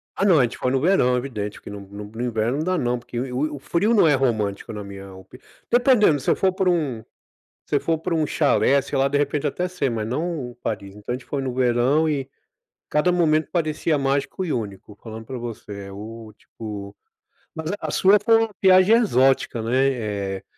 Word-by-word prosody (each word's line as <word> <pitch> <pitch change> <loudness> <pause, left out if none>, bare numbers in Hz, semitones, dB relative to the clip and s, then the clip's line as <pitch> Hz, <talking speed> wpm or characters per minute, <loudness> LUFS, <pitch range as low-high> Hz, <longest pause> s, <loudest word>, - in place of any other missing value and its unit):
Ah, 195 - 0
não, 180 -6 +5
a 130 - +5
gente 120 - -2
foi 125 - -1
no 135 - +2
verão, 155 -8 +3
evidente 110 -6 -5
que - - -10
no 100 -1 -7
no 100 +1 -9
no 110 +3 -8
inverno 120 +1 -1
não 155 - -1
dá, 185 +1 0
não, 125 -3 0
porque 120 0 -6
o 135 +4 -2
o 140 - -8
frio 200 +11 +1
não 200 -7 +5
é 150 - +4
romântico, 110 -6 -1
na 105 -1 -6
minha 100 -1 -10
opi 95 +6 -14 0.3
dependendo 240 - +4
se - - -3
eu - - +4
for 190 - +2
para 190 -1 +1
um 140 -10 -1 0.6
se 145 - +1
for 165 +2 0
para 170 0 -2
um 155 - +1
chalé, 140 -2 +2
sei 140 +1 -4
lá, 135 +1 +3
de 140 +1 0
repente 145 0 -1
até 180 +5 -1
ser, 160 -8 -2
mas 110 -2 -3
não 150 0 -3
em - - -14
Paris. 100 -4 -5
Então, 105 +3 -5
a - - 0
gente 130 - -10
foi 140 - -3
no 130 -2 -3
verão, 130 +5 +2
e 135 -3 -2 0.6
cada 150 +4 +2
momento 160 -3 +2
parecia 155 -2 0
mágico 140 +6 -1
e 165 - -2
único, 105 -3 -5
falando 110 0 -8
para 130 - -7
você 105 -4 -7
é 100 - -9
o 110 +2 -9
tipo, 105 -3 -8 0.6
mas 160 +2 -4
a - - -4
sua 195 +2 +5
foi 225 0 +5
uma 225 0 +1
viagem 185 +3 +6
exótica, 135 - +2
né, 130 +4 +2
eh, 100 -4 -4
135 Hz, 220 wpm, -23 LUFS, 110-160 Hz, 0.6 s, viagem